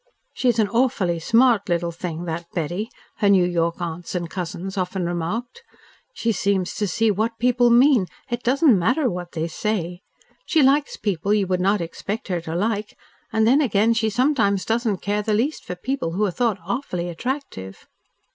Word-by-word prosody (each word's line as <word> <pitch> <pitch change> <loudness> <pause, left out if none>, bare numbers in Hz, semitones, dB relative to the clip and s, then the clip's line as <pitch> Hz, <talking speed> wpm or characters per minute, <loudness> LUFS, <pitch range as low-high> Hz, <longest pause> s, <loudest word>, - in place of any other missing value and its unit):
"She's 245 -3 +1
an 215 -2 +3
awfully 200 -7 +1
smart 230 +2 +3
little 170 0 0
thing, 170 0 -5
that 170 0 -4
Betty," 175 +6 -2 0.3
her 205 - +2
New 190 -3 +5
York 170 -1 0
aunts 170 +1 -5
and 175 -1 -2
cousins 180 +1 -5
often 185 -1 -2
remarked. 175 - -3 0.5
"She 230 - 0
seems 195 -2 0
to 210 - 0
see 220 +4 +2
what 220 +3 -1
people 245 0 +3
mean, 240 -4 +5 0.2
it 240 -1 -3
doesn't 255 - +4
matter 250 - +1
what 175 -1 -6
they 160 0 -2
say. 180 -1 -3 0.5
She 320 -4 +4
likes 280 +2 +2
people 200 0 0
you 205 -2 +2
would 185 -1 -1
not 200 +2 +2
expect 200 +6 -5
her 175 -2 -1
to 160 0 -5
like, 210 +2 -2 0.3
and 220 0 +2
then 265 +6 +5
again 225 -4 +3
she 225 -1 +1
sometimes 220 -5 +1
doesn't 225 -4 -1
care 205 +1 0
the 210 0 0
least 265 +8 -1
for 180 - -6
people 180 -4 -3
who 210 +4 +1
are 195 - -1
thought 230 0 0
awfully 185 -5 -3
attractive." 175 - -5
205 Hz, 180 wpm, -22 LUFS, 175-235 Hz, 0.5 s, New